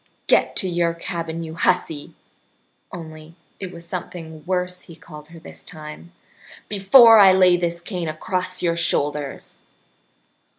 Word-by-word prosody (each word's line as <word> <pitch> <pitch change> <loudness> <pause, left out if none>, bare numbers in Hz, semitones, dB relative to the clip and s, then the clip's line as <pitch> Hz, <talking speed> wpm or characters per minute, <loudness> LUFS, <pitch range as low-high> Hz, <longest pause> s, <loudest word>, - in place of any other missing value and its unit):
Get - - +2
to 190 - 0
your 170 -1 0
cabin, 165 -1 -5
you 160 -1 -7
hussy" 160 -3 -1 0.8
(only 160 -2 -10 0.2
it 190 -2 -6
was 170 -1 -9
something 165 -4 -7
worse 180 -1 -2
he 165 - -14
called 155 -2 -13
her 165 +1 -13
this 160 - -12
time), 155 +1 -11 0.6
"before 220 +3 +7
I 195 -2 +8
lay 185 -1 +5
this 170 -1 -2
cane 175 -2 -5
across 185 +4 -3
your 170 -1 +1
shoulders!" 145 -4 -2
170 Hz, 135 wpm, -21 LUFS, 160-185 Hz, 0.8 s, I